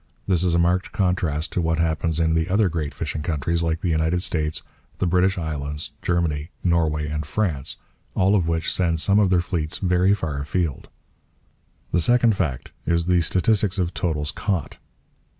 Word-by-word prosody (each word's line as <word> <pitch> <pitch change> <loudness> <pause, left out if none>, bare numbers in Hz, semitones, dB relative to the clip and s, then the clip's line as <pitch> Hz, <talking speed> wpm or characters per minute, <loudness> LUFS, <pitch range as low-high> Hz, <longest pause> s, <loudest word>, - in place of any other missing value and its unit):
This 90 -4 +2
is 90 -2 +2
a - - +3
marked 90 +2 +1
contrast 90 -6 0
to 90 - 0
what 80 -1 0
happens 80 0 0
in 80 -1 +2
the 80 +2 0
other 100 +1 +3
great 80 -3 -3
fishing 75 +1 -4
countries, 85 +1 -1
like 80 0 -1
the 90 - -1
United 80 +3 +1
States, 75 -2 -1 0.3
the - - 0
British 90 +2 +2
islands, 75 -3 -3
Germany, 80 -4 -1
Norway, 80 -4 +1
and 75 0 -3
France, 75 -4 -1 0.4
all 95 +2 +3
of 90 -5 +2
which 80 0 0
send 85 -3 +1
some 100 +5 +3
of 100 -3 +4
their 90 -1 +3
fleets 80 -4 -2
very 90 +1 +3
far 80 -7 -3
afield. 75 0 -2 1.0
The 85 - +2
second 120 +2 +4
fact 75 -10 -2 0.2
is 85 0 +2
the 90 -1 +3
statistics 100 +4 +1
of 90 -2 -1
totals 75 -4 -1
caught. 95 -9 -3
85 Hz, 175 wpm, -23 LUFS, 80-90 Hz, 1.0 s, of